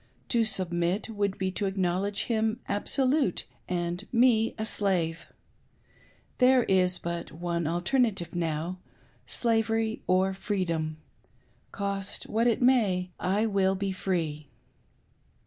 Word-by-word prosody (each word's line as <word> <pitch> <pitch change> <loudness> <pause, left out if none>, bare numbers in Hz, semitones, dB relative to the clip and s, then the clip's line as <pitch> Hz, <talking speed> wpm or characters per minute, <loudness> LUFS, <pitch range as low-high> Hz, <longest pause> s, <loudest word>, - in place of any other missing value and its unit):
"To 235 -2 +3
submit. 185 -1 0
would 200 -2 -1
be 190 0 -1
to 195 +2 -2
ac 195 0 -3
knowledge 190 +3 0
him 220 0 0
absolute, 260 - +1 0.2
and 175 +2 -2
me 230 -2 +3
a 220 - -2
slave. 175 -6 0 1.1
There 255 0 +6
is 185 -2 +2
but 170 0 -5
one 170 0 -2
alternative 180 - 0
now 170 +1 -2 0.2
— - - -31 0.2
slavery 225 -1 0
or 190 +1 +3
freedom. 170 -6 -2 0.7
Cost 200 -1 -3
me - - -11
what 230 +2 +3
it 235 +1 +2
may, 200 -8 +3
I 195 +4 +1
w/// 195 -3 +2
be 195 0 -1
free!" 165 -6 -2
190 Hz, 125 wpm, -28 LUFS, 175-220 Hz, 1.1 s, There